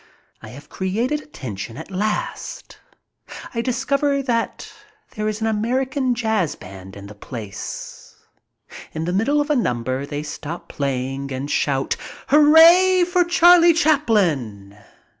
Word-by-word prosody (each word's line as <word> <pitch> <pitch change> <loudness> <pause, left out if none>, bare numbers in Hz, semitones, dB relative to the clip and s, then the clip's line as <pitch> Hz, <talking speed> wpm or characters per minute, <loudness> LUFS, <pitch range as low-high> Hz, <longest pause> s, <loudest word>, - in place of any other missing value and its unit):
I - - -10
have 140 +6 -12
created 230 +11 -2
attention 115 - -8
at 160 +5 -9
last. 210 +3 -4 0.7
I 230 - -1
discover 275 +3 0
that 235 -3 -2 0.4
there 215 -2 -3
is 215 +1 -3
an - - 0
American 255 +4 0
jazz 220 -9 0
band 95 0 -12
in 100 - -10
the 105 - -10
place. 105 -1 -8 0.8
In 160 +1 -3
the 175 - -2
middle 270 +10 +1
of 290 +1 0
a - - +3
number 130 - -1
they 145 0 -4
stop 170 +3 -7
playing 135 0 -3
and 135 +3 -4
shout: 135 -2 0 0.3
"Hooray 330 +5 +6
for 355 0 +2
Charlie 345 0 +6
Chaplin!" 180 - +1
210 Hz, 130 wpm, -21 LUFS, -, 0.8 s, Hooray